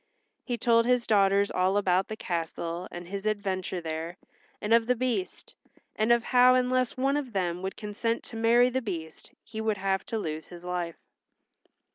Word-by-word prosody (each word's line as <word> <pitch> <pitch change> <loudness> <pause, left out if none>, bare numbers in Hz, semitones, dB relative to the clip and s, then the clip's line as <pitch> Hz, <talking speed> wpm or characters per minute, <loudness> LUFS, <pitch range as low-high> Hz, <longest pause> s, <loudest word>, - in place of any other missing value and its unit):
He 245 - -3
told 230 0 +3
his 250 -1 +2
daughters 200 -1 +3
all 185 +2 +2
about 190 -2 +2
the 215 - -5
castle 170 -1 -4
and 175 0 -8
his 200 +2 -4
adventure 190 -3 -2
there 160 +1 -5 0.4
and 210 +2 0
of 230 0 +4
the 250 - +3
Beast, 255 - -3 0.4
and 215 +2 +2
of 235 0 +4
how 250 0 +5
unless 255 0 +1
one 275 +2 +2
of 265 -5 -4
them 180 -2 -1
would 190 0 -4
consent 225 +2 -2
to - - -10
marry 235 +2 +4
the 260 +1 0
Beast 165 -8 -6
he 220 -1 -6
would 220 -2 0
have 195 0 0
to 225 - -2
lose 155 -6 -4
his 175 0 -11
life. 175 -2 -3
205 Hz, 180 wpm, -28 LUFS, 180-235 Hz, 0.4 s, how